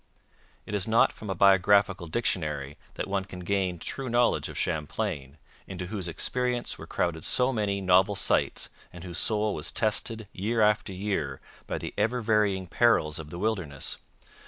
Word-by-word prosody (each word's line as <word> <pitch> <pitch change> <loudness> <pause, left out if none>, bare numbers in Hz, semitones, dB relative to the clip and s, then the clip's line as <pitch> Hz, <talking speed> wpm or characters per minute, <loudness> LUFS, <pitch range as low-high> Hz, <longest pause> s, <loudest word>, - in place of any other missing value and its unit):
It - - -7
is 100 -3 +1
not 115 +1 +4
from 105 - -9
a 95 - -1
biographical 95 -1 +4
dictionary 75 -8 -2 0.2
that - - -3
one 100 -1 -1
can 95 -1 -9
gain 95 -1 0
true 130 +9 -4
knowledge 120 0 +2
of - - -8
Champlain, 75 -3 -2 0.3
into 90 -1 -5
whose 95 -1 -4
experience 125 +8 -1
were - - -9
crowded 80 -3 -1
so 125 +1 +2
many 100 -3 -1
novel 95 +2 +4
sights - - +1 0.2
and 85 -1 -10
whose 90 -1 -5
soul 105 -2 +1
was - - -2
tested, 110 0 0
year 110 +5 -1
after 105 -2 +3
year, 100 +2 -2 0.3
by - - -2
the - - -6
ever 125 +3 +1
varying 105 -4 +2
perils 90 -7 +2
of 75 -2 -8
the 85 - -7
wilderness. 90 -9 -2
100 Hz, 165 wpm, -28 LUFS, 90-110 Hz, 0.3 s, not